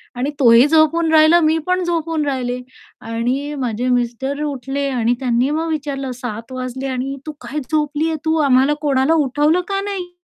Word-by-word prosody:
आणि 255 +3 -2
तोही 240 0 +6
झोपून 320 +1 +3
राहिला, 315 +2 +6
मी 315 0 +3
पण 365 0 +1
झोपून 330 -3 -1
राहिले 250 -2 -2 0.4
आणि 250 +6 -2
माझे 245 0 -2
मिस्टर 250 +3 -1
उठले 280 0 -3
आणि 240 -2 +1
त्यांनी 250 0 +1
मग 320 +2 -1
विचारलं, 280 -4 -3
"7.00 235 -2 -7
वाजले 255 +1 -5
आणि 265 +1 -3
तू 310 - -4
काय 250 +5 -4
झोपली 300 0 0
आहे 315 - -2
तू? 320 0 +2
आम्हाला 270 0 +4
कोणाला 275 +1 +2
उठवलं 300 +3 +2
का" 390 0 -1
"नाही?" 390 -3 -5
275 Hz, 170 wpm, -19 LUFS, 250-315 Hz, 0.4 s, तोही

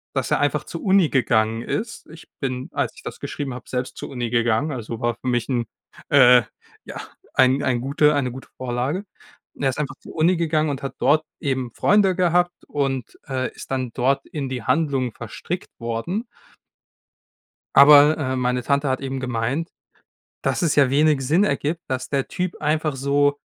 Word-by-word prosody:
dass - - -1
er - - +3
einfach - - 0
zur - - -7
Uni 190 -5 +4
gegangen 115 -3 +1
ist. 215 - -4
Ich 165 - -13
bin, 130 -2 -3
als - - -1
ich - - -14
das - - -7
geschrieben 140 -3 -5
habe, 125 -1 -10
selbst 125 0 -3
zur - - -6
Uni 120 -3 -3
gegangen. 120 +5 +1
Also 115 -3 -5
war 120 0 0
für 130 - -9
mich 120 -2 0
'n 120 -2 0 0.4
äh, 125 -1 +7 0.4
ja, - - -7 0.3
ein 130 +2 +4
ein 125 -3 0
gute 145 +3 +3
eine 130 -3 0
gute 130 +2 -10
Vorlage. 130 +8 -2 0.5
Und - - -6
er 135 - +3
ist 130 - -4
einfach 145 -1 -3
zur - - -12
Uni 165 +3 +3
gegangen 155 -2 +1
und 140 -1 -4
hat 135 - -4
dort 155 +2 +3 0.2
eben 130 -4 -1
Freunde 200 -3 +3
gehabt 175 0 +2
und, 135 -4 -3
äh, 130 -2 -2
ist - - -10
dann 130 -2 -2
dort 135 +2 +1
in 145 -3 -4
die 125 -3 -4
Handlung 135 -6 +1
verstrickt 120 - -6
worden. 120 - -3 1.5
Aber, 145 +2 +8
äh, 130 -3 -1
meine 125 0 0
Tante 140 +1 +1
hat 130 0 0
eben 135 -1 -4
gemeint, 130 +5 -2 0.7
dass - - 0
es 165 -4 +1
ja 140 -3 +5
wenig 150 +1 +3
Sinn 165 +9 +3
ergibt, 155 0 -1
dass 130 -1 -3
der 140 -2 -1
Typ 180 -1 -3
einfach 155 -1 0
so 145 +1 +2
135 Hz, 185 wpm, -22 LUFS, 125-155 Hz, 1.5 s, Aber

